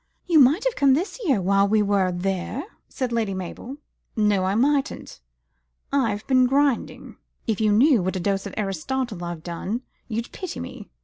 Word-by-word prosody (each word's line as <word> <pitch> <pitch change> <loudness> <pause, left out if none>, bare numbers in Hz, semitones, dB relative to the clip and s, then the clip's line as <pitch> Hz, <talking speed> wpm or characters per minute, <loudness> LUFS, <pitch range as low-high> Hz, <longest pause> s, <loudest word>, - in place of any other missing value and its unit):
"You 335 -4 +4
might 285 - +5
have - - 0
come 275 -2 +4
this 365 - -3
year 270 - +3
while 195 +2 +3
we 210 +1 +3
were 200 -2 +2
there," 190 +7 -2 0.3
said 255 -3 -3
Lady 220 -4 -1
Mabel. 190 +9 -7 0.4
"No, 210 -3 +2
I 190 +2 0
mightn't. 275 - 0 0.7
I've 225 -7 0
been 255 -1 +4
grinding. 275 -1 0 0.3
If 220 -1 -1
you 215 -1 +3
knew 245 +2 +5
what 185 +2 -2
a - - -1
dose 195 +2 -1
of 200 - -9
Aristotle 210 +2 -3
I've 170 -2 -6
had, 185 +7 -3 0.3
you'd 230 0 -4
pity 370 - -6
me. - - -8
215 Hz, 175 wpm, -24 LUFS, 195-265 Hz, 0.7 s, might